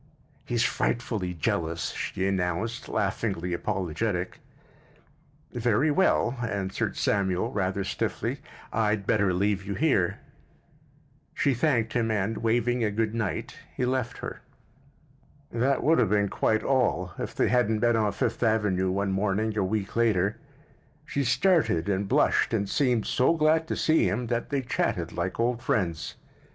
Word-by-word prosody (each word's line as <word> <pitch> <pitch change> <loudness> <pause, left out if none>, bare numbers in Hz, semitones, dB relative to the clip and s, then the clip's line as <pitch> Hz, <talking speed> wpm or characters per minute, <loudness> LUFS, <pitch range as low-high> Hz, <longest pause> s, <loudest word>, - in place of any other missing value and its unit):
"He's 120 -1 0
frightfully 105 -7 -1
jealous," 85 +1 -1
she 95 +1 -2
announced, 95 +4 -2
laughingly 95 -3 -1
apologetic. 90 +2 -2 1.1
"Very 120 +5 +2
well," 135 -7 +2
answered 100 -5 -2
Samuel, 100 +2 0
rather 100 -3 -1
stiffly. 95 - -2 0.3
"I'd 105 -2 +1
better 100 -4 +2
leave 100 +2 0
you 100 +1 -4
here." 135 - +2 1.2
She 140 - +2
thanked 120 -4 +1
him 115 -2 +1
and, 105 0 -1
waving 120 +1 +1
a 105 - +2
good 110 +1 -1
night, 110 -5 -3 0.2
he 125 - +1
left 125 -1 -1
her. - - -7 1.1
That 130 +4 +1
would 160 +2 +4
have - - +3
been 105 -1 +2
quite 110 +2 +1
all 115 -9 +1
if - - -4
they - - +2
hadn't 110 -3 +2
met 120 -1 +4
on 105 -2 +2
Fifth - - -2
Avenue 105 -5 +2
one 100 +1 0
morning 105 +2 0
a 105 - +1
week 100 +1 -2
later. 105 -4 +2 0.7
She 140 - -1
started 145 - +2
and 100 0 0
blushed 115 - +2
and 100 -2 -1
seemed 125 -2 +1
so 130 +6 +2
glad 160 +1 +2
to - - -2
see 160 0 +3
him 120 +4 -2
that 120 - -2
they 140 -2 -1
chatted 90 -8 -1
like 90 +3 -3
old 120 0 +1
friends. 95 - -1
110 Hz, 145 wpm, -27 LUFS, 95-120 Hz, 1.2 s, would